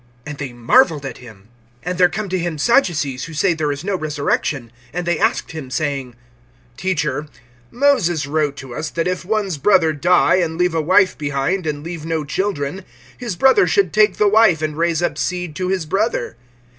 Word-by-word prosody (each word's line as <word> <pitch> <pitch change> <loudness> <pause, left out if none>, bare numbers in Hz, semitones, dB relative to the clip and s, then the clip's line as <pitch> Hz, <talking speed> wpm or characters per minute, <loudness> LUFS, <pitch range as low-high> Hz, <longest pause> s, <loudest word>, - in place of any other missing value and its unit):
And 150 -1 -7
they 140 -3 -4
marveled 145 - +3
at 130 -3 -7
him. 110 -4 -15 0.4
(18)And 180 0 -2
there 180 -1 +5
come 215 +2 -4
to 185 0 -1
him 170 -2 -3
Sadducees, 145 - +1
who 160 - -9
say 175 +4 +2
there 155 -2 -1
is 145 +2 -5
no 200 +1 -1
resurrection. 145 -5 -2 0.2
And 175 +2 -4
they 175 -2 0
asked - - 0
him, 155 -5 -7
saying: 135 -3 -3 0.6
(19)Teacher, 170 -4 -1 0.4
Moses 230 - +2
wrote 145 -1 -1
to 130 -3 -9
us, 150 +5 -4
that 165 +2 -2
if 180 0 -2
one's 195 -5 -1
brother 170 -2 +4
die, 175 +5 +3
and 165 -3 -1
leave 180 -1 +1
a 165 - +1
wife 185 +4 +3
behind, 150 +5 -2
and 145 -1 -3
leave 165 -1 -6
no 160 -1 -2
children, 185 +1 -2 0.3
his 235 -7 -5
brother 265 - +4
should 400 -2 +2
take 215 -2 +3
the 210 - +3
wife, 205 -7 +4
and 155 -1 -2
raise 170 +1 0
up - - -1
seed 180 -4 -3
to 185 -1 -2
his 185 -3 -1
brother. 195 - -1
165 Hz, 195 wpm, -19 LUFS, 145-185 Hz, 0.6 s, there